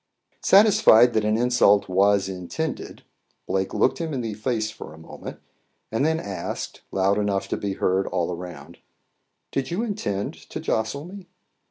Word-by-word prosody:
Satisfied 195 Hz, -, +6 dB
that 110 Hz, -, +1 dB
an 105 Hz, +1 st, +1 dB
insult 120 Hz, -4 st, +4 dB
was 100 Hz, +1 st, +3 dB
intended, 95 Hz, -, -5 dB, 0.4 s
Blake 95 Hz, 0 st, -1 dB
looked -, -, +1 dB
him 160 Hz, -3 st, -3 dB
in 130 Hz, -, -2 dB
the 115 Hz, -2 st, -3 dB
face 110 Hz, 0 st, -2 dB
for 95 Hz, -7 st, -10 dB
a -, -, -16 dB
moment, 80 Hz, -, -10 dB, 0.5 s
and 115 Hz, +4 st, 0 dB
then 160 Hz, +1 st, +2 dB
asked, 100 Hz, -8 st, -5 dB
loud 95 Hz, +2 st, +2 dB
enough 100 Hz, -2 st, -1 dB
to -, -, 0 dB
be 100 Hz, -1 st, -3 dB
heard 95 Hz, 0 st, 0 dB
all 85 Hz, +1 st, -1 dB
around 85 Hz, -5 st, -10 dB, 0.7 s
"Did 135 Hz, -, -2 dB
you 180 Hz, +7 st, -1 dB
intend 105 Hz, -, -3 dB, 0.2 s
to -, -, -5 dB
jostle 110 Hz, +7 st, -2 dB
me?" 190 Hz, 0 st, -10 dB
110 Hz, 160 wpm, -24 LUFS, 95-140 Hz, 0.7 s, Satisfied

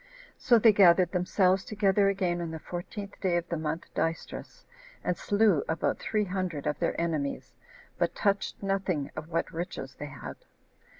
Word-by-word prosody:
So 240 Hz, -2 st, +4 dB
they 225 Hz, -1 st, +6 dB
gathered 180 Hz, -2 st, +6 dB
themselves 185 Hz, +1 st, +2 dB
together 200 Hz, -1 st, +2 dB
again 180 Hz, -3 st, 0 dB
on 170 Hz, -, -3 dB
the 160 Hz, -, -5 dB
fourteenth 180 Hz, +5 st, -7 dB
day 180 Hz, -3 st, +2 dB
of 170 Hz, 0 st, -3 dB
the 170 Hz, -, -1 dB
month 160 Hz, +1 st, -4 dB
Dystrus, 165 Hz, -, -3 dB, 0.4 s
and 180 Hz, -, 0 dB
slew 205 Hz, -7 st, +2 dB
about 160 Hz, 0 st, 0 dB
three 215 Hz, -1 st, 0 dB
hundred 180 Hz, -6 st, -3 dB
of 150 Hz, -, -1 dB
their -, -, 0 dB
enemies, 155 Hz, -4 st, -2 dB, 0.5 s
but -, -, 0 dB
touched 200 Hz, 0 st, 0 dB
nothing 190 Hz, -7 st, -1 dB
of 155 Hz, -, -6 dB
what 165 Hz, 0 st, -2 dB
riches 170 Hz, +2 st, -5 dB
they -, -, -5 dB
had. -, -, -8 dB
180 Hz, 165 wpm, -29 LUFS, 165-200 Hz, 0.5 s, they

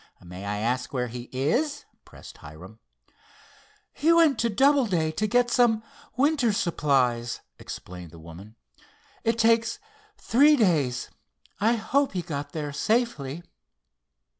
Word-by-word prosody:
"May 90 Hz, +3 st, -9 dB
I 105 Hz, 0 st, -2 dB
ask 125 Hz, +4 st, -2 dB
where 125 Hz, -3 st, -2 dB
he 120 Hz, +1 st, -8 dB
is?" 245 Hz, -, -1 dB, 0.2 s
pressed -, -, -14 dB
Hiram. 90 Hz, +9 st, -12 dB, 1.1 s
"He 315 Hz, +4 st, +2 dB
went 325 Hz, -7 st, +4 dB
to 235 Hz, -, +1 dB
Doubleday 220 Hz, -, +2 dB
to 215 Hz, +7 st, -1 dB
get 245 Hz, +2 st, +2 dB
some 235 Hz, -3 st, +3 dB, 0.3 s
winter 280 Hz, -4 st, +2 dB
supplies," 130 Hz, -10 st, 0 dB, 0.2 s
explained 90 Hz, -2 st, -9 dB
the 85 Hz, -, -14 dB
woman. 85 Hz, +7 st, -12 dB, 0.7 s
"It 225 Hz, 0 st, +1 dB
takes 230 Hz, -, +2 dB, 0.4 s
three 290 Hz, +6 st, +4 dB
days. 155 Hz, -, +1 dB, 0.5 s
I 225 Hz, +4 st, +3 dB
hope 265 Hz, +5 st, 0 dB
he 180 Hz, -2 st, -2 dB
got 145 Hz, -3 st, -5 dB
there 150 Hz, -3 st, -5 dB
safely." 175 Hz, -, -1 dB
170 Hz, 125 wpm, -26 LUFS, -, 1.1 s, went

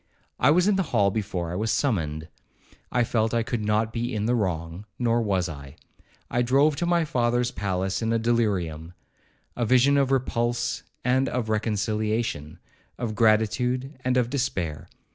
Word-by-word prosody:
I 125 Hz, -, +4 dB
was 180 Hz, +5 st, +4 dB
in 205 Hz, -2 st, +3 dB
the -, -, +2 dB, 0.2 s
hall 100 Hz, -1 st, +4 dB
before 95 Hz, -5 st, -3 dB
I -, -, -4 dB
was 110 Hz, +4 st, -1 dB
summoned. 80 Hz, -, -1 dB, 0.6 s
I 125 Hz, -, +2 dB
felt 115 Hz, 0 st, 0 dB
I 115 Hz, -, +2 dB
could 115 Hz, -1 st, -3 dB
not 105 Hz, +1 st, 0 dB
be 120 Hz, +1 st, -2 dB
in 105 Hz, 0 st, -1 dB
the 120 Hz, -, +2 dB
wrong, 90 Hz, -3 st, -2 dB
nor 120 Hz, -1 st, +1 dB
was 95 Hz, -5 st, 0 dB
I. 70 Hz, -3 st, -9 dB, 0.5 s
I 120 Hz, -, 0 dB
drove 140 Hz, +5 st, +3 dB
to 175 Hz, -, -1 dB
my 170 Hz, -1 st, +2 dB
father's 120 Hz, -4 st, +1 dB
palace 95 Hz, -1 st, -2 dB
in 115 Hz, 0 st, 0 dB
a 115 Hz, -, +2 dB
delirium,—a 95 Hz, -8 st, -1 dB, 0.7 s
vision 130 Hz, +4 st, +4 dB
of 135 Hz, -2 st, +2 dB
repulse 120 Hz, -3 st, 0 dB, 0.2 s
and 130 Hz, +2 st, +2 dB
of 120 Hz, -3 st, -2 dB
reconciliation, 110 Hz, -5 st, -1 dB, 0.4 s
of 115 Hz, -3 st, -3 dB
gratitude 120 Hz, +5 st, +1 dB
and 130 Hz, 0 st, +1 dB
of 125 Hz, -1 st, +1 dB
despair. 90 Hz, -, -2 dB
115 Hz, 160 wpm, -25 LUFS, 100-125 Hz, 0.7 s, I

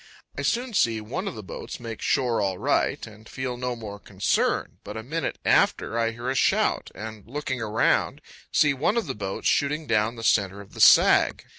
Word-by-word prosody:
I -, -, -4 dB
soon 240 Hz, 0 st, -1 dB
see 115 Hz, -, +2 dB
one 135 Hz, -, -5 dB
of 195 Hz, -, -4 dB
the 110 Hz, -, -8 dB
boats 95 Hz, -, -8 dB
make 115 Hz, -2 st, -7 dB
shore 125 Hz, -6 st, +1 dB
all 95 Hz, -2 st, -1 dB
right, -, -, 0 dB
and 110 Hz, 0 st, -14 dB
feel 130 Hz, -2 st, -4 dB
no 125 Hz, 0 st, -3 dB
more 105 Hz, -3 st, -8 dB
concern; -, -, -1 dB
but -, -, -7 dB
a 110 Hz, -, -6 dB
minute 160 Hz, +7 st, -3 dB
after, 110 Hz, -, +2 dB
I 115 Hz, -1 st, +2 dB
hear 120 Hz, +2 st, -7 dB
a 130 Hz, -, +1 dB
shout, 135 Hz, -, +1 dB
and, 110 Hz, 0 st, -8 dB
looking 130 Hz, -1 st, -4 dB
around, 110 Hz, 0 st, +1 dB, 0.3 s
see 150 Hz, -2 st, +4 dB
one 165 Hz, -, 0 dB
of 235 Hz, -, 0 dB
the 135 Hz, -, -3 dB
boats 100 Hz, -3 st, -4 dB
shooting 150 Hz, +2 st, +1 dB
down 110 Hz, -1 st, +1 dB
the 115 Hz, -, -8 dB
center 100 Hz, -3 st, +2 dB
of 100 Hz, -1 st, -13 dB
the -, -, -5 dB
sag. -, -, +6 dB
115 Hz, 200 wpm, -25 LUFS, 110-140 Hz, 0.3 s, sag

